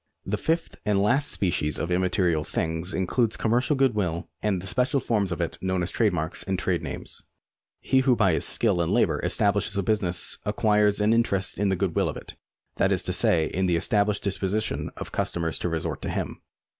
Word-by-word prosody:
The 100 - -1
fifth 165 +10 -1
and 105 -2 +1
last 130 +9 +2
species 75 -5 0
of 85 - -3
immaterial 90 -3 +1
things 80 +4 -2
includes 110 +5 0
com 110 - -1
mercial 125 +4 +2
good 135 -2 +3
will 85 -5 -2
and 105 -3 0
the 90 - -8
special 125 +6 +1
forms 105 -6 0
of 85 - -3
it 85 - -3
known 95 -1 0
as 85 - -2
trade 110 -3 +2
marks 80 -1 -2
and 95 -1 -1
trade 90 -2 0
names. 80 - -5 0.6
He 130 - +2
who 130 -1 +3
by 100 -6 +3
his - - 0
skill 100 -7 +1
and 85 - 0
labour - - +2
establishes 100 - +1
a 100 - +1
business 95 -4 0
acquires 105 0 +2
thereby 105 0 +2
an - - +5
interest 100 -6 0
in 100 -1 +2
the 95 - +2
good 95 -2 -1
will - - +2
of - - -5
it, - - -9 0.4
that - - +2
is - - +1
to - - -2
say, 80 -2 +3
in 95 +4 -1
the 90 - +2
established 100 +4 +1
disposition 100 +2 -1
of - - -7
customers 85 -1 -2
to 90 - -1
resort 80 -1 -3
to - - -3
him. - - -4
95 Hz, 215 wpm, -26 LUFS, 85-110 Hz, 0.6 s, an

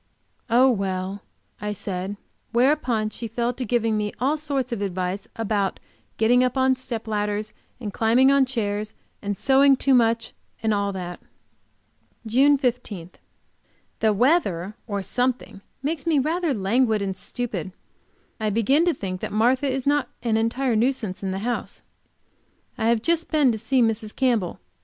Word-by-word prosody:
"Oh, 245 +3 +5
well," 195 -3 -1 0.4
I 210 0 -2
said, 195 0 -4 0.3
whereupon 240 -3 +2
she 230 - -5
fell 235 +2 -1
to 255 - -5
giving 230 -1 +1
me 210 0 -1
all 275 +4 +2
sorts 280 -5 -2
of 230 -4 -3
advice 185 0 -3
about 210 -3 -1 0.4
getting 245 +3 +4
up 255 +1 0
on 260 0 +3
step 240 -3 -6
ladders, 210 0 -2 0.3
and 210 -5 -5
climbing 240 +4 +4
on 275 -1 +4
chairs, 215 -4 -2 0.3
and 205 -1 -3
sewing 270 +3 +5
too 270 +1 +2
much 230 -2 +2 0.3
and 220 -1 +2
all 200 -1 0
that. 180 -2 -6 1.1
JUNE 270 +6 +4
15. 230 - -2 0.9
The 220 - +3
weather, 210 - +2
or 200 -3 -2
something, 250 -3 -2 0.2
makes 310 +2 -2
me 320 -3 +3
rather 320 +4 +1
languid 220 0 +1
and 195 -1 -2
stupid. 195 -3 -5 0.7
I 215 -1 0
begin 250 - +3
to 345 - +2
think 185 -5 -5
that - - -4
Martha 255 +6 +2
is 265 0 -3
not 285 -3 +2
an 230 -2 +1
entire 230 +3 +1
nuisance 225 -4 0
in 195 - -2
the 190 +3 -3
house. 245 0 -3 0.9
I 220 - -1
have 230 -1 +2
just 335 0 +1
been 295 -5 +4
to 220 - -2
see 250 +3 +2
Mrs. 220 -1 -1
Campbell. 235 -9 0
230 Hz, 155 wpm, -24 LUFS, 205-260 Hz, 1.1 s, Oh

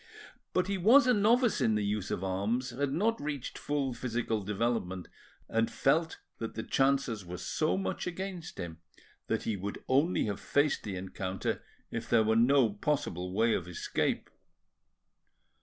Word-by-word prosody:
But 185 - +2
he 195 0 -2
was 240 +10 +7
a 250 - +5
novice 235 +3 +3
in 110 - +3
the 105 -1 0
use 100 -1 -1
of 90 - -2
arms, 105 +7 -1
had 135 +3 -1
not 220 +9 +1
reached 145 -4 -4
full 140 -3 -1
physical 120 -3 -2
development, 100 -3 -1 0.4
and 115 0 +1
felt 160 +4 +1 0.2
that 115 - -5
the 110 - -3
chances 135 -6 +1
were 90 0 -7
so 90 - 0
much 95 - -2
against 180 -1 -5
him 80 -1 -6 0.5
that - - 0
he 110 - -1
would 100 +1 -5
only 145 +7 +3
have 100 -3 -3
faced 145 +1 +1
the 100 -3 -5
encounter 95 0 -3 0.3
if 115 0 -4
there 115 -2 +5
were 110 +1 +2
no 120 0 +5
possible 100 - -1
way 115 +4 +3
of 85 - -2
escape. 90 - -1
115 Hz, 160 wpm, -31 LUFS, 100-150 Hz, 0.5 s, was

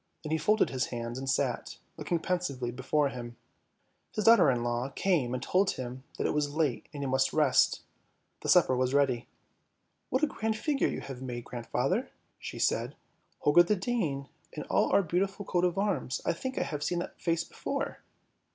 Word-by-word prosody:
Then 155 - -5
he 160 - +1
folded 215 +6 +3
his 130 -2 -1
hands 120 +1 -4
and 135 0 -4
sat, 130 -2 -1 0.2
looking 175 - -1
pensively 160 -9 -2
before 140 +4 +1
him. 120 -2 -7 0.8
His 215 - -1
daughter 225 -9 +7
in 120 -2 +1
law 120 +2 -1
came 150 -6 +1
and 125 0 -3
told 185 +5 +2
him 130 0 -6
that - - -1
it - - +1
was 145 -1 -1
late 150 -7 0
and 145 -2 -5
he - - -1
must 135 0 +2
rest, 150 -4 +3 0.6
the - - -5
supper 130 - +5
was 130 +1 +1
ready. 130 -4 +2 0.4
" - - -48
What 260 +4 0
a - - +8
grand 220 -6 -2
figure 280 +4 +1
you - - -3
have 130 -2 -8
made, 120 -2 -5
grandfather," 125 - -1 0.3
she - - -7
said. - - 0 0.2
" - - -42
Holger 145 +4 +6
the 175 +5 +2
Dane 180 - -1 0.3
and - - -5
all - - +3
our 200 - +5
beautiful 195 +4 -1
coat 175 -1 0
of 180 +1 0
arms 185 -11 0
— - - -22
I 170 - +2
think 260 +10 -5
I - - +2
have 150 -2 -4
seen 175 - 0
that 175 - -5
face 165 -1 +1
before! - - -4
145 Hz, 200 wpm, -30 LUFS, 130-180 Hz, 0.8 s, a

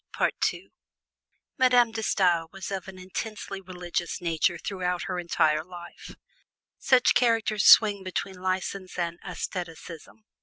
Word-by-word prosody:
Madame 245 -2 +5
De 225 0 -4
Stael 175 -6 +1
was 195 +1 -7
of 195 -1 -4
an 190 -1 -10
intensely 195 +1 -6
religious 180 -1 -4
nature 170 0 0
throughout 180 -2 -3
her 180 - -3
entire 155 -3 +1
life; 175 0 -11 0.6
such 255 -1 +4
characters 225 -4 +2
swing 205 -3 +7
between 185 0 -5
license 185 0 -3
and 170 -1 -3
asceticism. 165 - -7
185 Hz, 115 wpm, -26 LUFS, 175-200 Hz, 0.6 s, swing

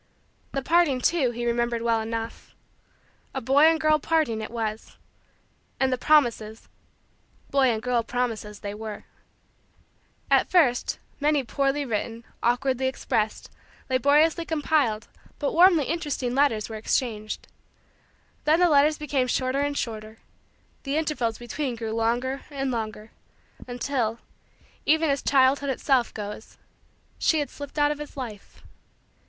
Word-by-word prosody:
The 275 - -2
parting, 325 -4 +3
too, 280 -1 +2
he 240 0 -4
remembered 235 0 0
well 230 -1 +2
enough. 225 +1 -6 0.8
A - - 0
boy 270 +5 +4
and 325 0 +4
girl 310 -1 +3
parting 305 -9 0
it 215 - -5
was. 220 -2 -5 0.8
And 265 -1 +2
the - - 0
promises 235 -8 +2 0.8
boy 275 -1 +4
and 220 -2 -1
girl 250 -1 +1
promises 225 -4 -3
they 200 0 -5
were. 215 0 -7 1.3
At - - +4
first 280 -10 +3 0.2
many 295 -1 +2
poorly 275 +3 0
written, 230 0 -3 0.2
awkwardly 260 +2 +1
expressed, 220 -4 -2 0.4
laboriously 295 +6 +3
compiled, 295 -9 0 0.3
but 285 - -2
warmly 340 -3 +6
interesting 295 -6 -2
letters 260 -6 +2
were 220 - -6
exchanged. 215 -1 -2 1.0
Then 315 +2 +4
the 355 -1 +5
letters 295 +1 +4
became 280 -4 -1
shorter 255 +2 0
and 285 0 -1
shorter; 220 -1 -5 0.6
the 275 +1 -2
intervals 270 -8 -1
between 245 +2 -4
grew 225 -1 -4
longer 240 +4 0
and 270 -2 -2
longer; 215 -2 -5 0.6
until, 245 -2 -2 0.7
even 315 0 +3
as 280 - -1
childhood 275 +1 +3
itself 260 -1 +1
goes, 210 +1 -8 0.6
she 320 - +3
had 290 -2 -2
slipped 285 +1 -9
out 290 0 +3
of 295 - -4
his 295 -1 -9
life. 225 -6 -8
260 Hz, 135 wpm, -25 LUFS, 230-290 Hz, 1.3 s, warmly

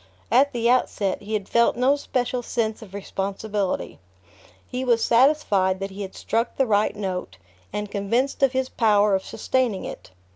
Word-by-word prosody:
At 275 +4 +5
the 235 -3 0
outset, 225 -6 +1
he 210 +1 -6
had 200 -2 -3
felt 235 0 +3
no 260 +3 +4
special 250 -3 -2
sense 225 -2 -2
of 200 -3 -11
responsibility. 200 0 -3 0.7
He 250 0 -3
was 235 -3 +2
satisfied 230 -8 +3
that 195 0 -4
he 195 +2 -8
had 190 -1 -6
struck 230 +1 -2
the 270 - +3
right 210 -2 +2
note, 185 - -4 0.3
and 210 -1 -4
convinced 230 +8 -1
of 270 -2 +4
his 260 0 0
power 210 -4 +3
of 190 0 +1
sustaining 250 -7 -1
it. - - -8
220 Hz, 170 wpm, -24 LUFS, 200-250 Hz, 0.7 s, At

